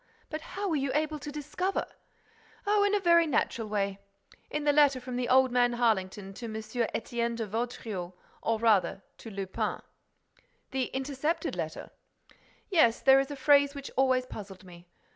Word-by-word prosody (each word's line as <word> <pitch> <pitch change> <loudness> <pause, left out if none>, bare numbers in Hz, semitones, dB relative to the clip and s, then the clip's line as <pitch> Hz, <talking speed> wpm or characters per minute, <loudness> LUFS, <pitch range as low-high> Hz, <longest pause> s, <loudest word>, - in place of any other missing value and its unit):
But 310 0 -4
how 400 +5 -4
were 335 - 0
you 275 0 -1
able 305 0 0
to 295 - -7
discover—?" 300 +6 -2 0.8
"Oh, 410 0 +3
in 410 0 +3
a - - +2
very 340 -3 +5
natural 235 -5 0
way! 200 -1 -1 0.5
In 300 0 -2
the 290 0 +3
letter 285 -3 +5
from 250 0 -5
old 260 0 +5
man 245 -1 +3
Harlington 205 -4 0
to 235 - -8
M. 220 - -6
Étienne 235 +1 -2
de 230 -1 -3
Vaudreix, 215 -4 -4 0.3
or 225 - +1
rather 210 -3 +2 0.2
to 225 - -9
Lupin—" 195 -2 -3 0.9
"The 265 -1 0
intercepted 275 +5 -2
letter?" - - -5 0.8
"Yes. 240 -11 +4
There 270 0 +6
is 270 - -1
a 290 - -5
phrase 285 +1 +4
which 280 -1 -7
always 260 -1 +3
puzzled 195 -6 -9
me. 175 -1 -14
255 Hz, 160 wpm, -29 LUFS, 220-295 Hz, 0.9 s, There